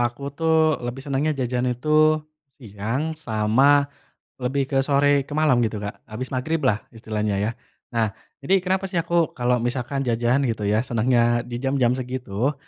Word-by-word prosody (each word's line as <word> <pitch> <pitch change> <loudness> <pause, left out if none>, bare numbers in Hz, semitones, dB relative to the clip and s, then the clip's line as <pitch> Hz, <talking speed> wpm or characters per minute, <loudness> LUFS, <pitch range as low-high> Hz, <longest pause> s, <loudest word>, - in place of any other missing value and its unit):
aku 120 +4 -2
tuh 160 0 +2
lebih 120 +2 -6
senangnya 145 +2 0
jajan 125 -1 -1
itu 125 +4 -4 0.7
siang 115 +7 -3
sama 135 +1 +3 0.6
lebih 135 +2 0
ke 135 - -1
sore 140 0 +2
ke 145 - -6
malam 150 -6 +3
gitu, 110 -2 0
Kak. 100 - -7
Habis 120 +4 -6
magriblah 130 -3 0 0.2
istilahnya 105 -2 -2
ya, 105 - 0 0.4
nah 110 -3 0 0.3
jadi 185 +7 +2
kenapa 190 +1 0
sih 190 - -11
aku 170 -1 +1
kalau 125 0 +1
misalkan 125 +2 -2
jajan 120 +3 +1
gitu 115 -3 -2
ya 105 +1 +2
senangnya 120 0 +2
di 120 0 -5
jam-jam 135 -2 +2
segitu? 125 0 -2
130 Hz, 155 wpm, -23 LUFS, 115-145 Hz, 0.7 s, sama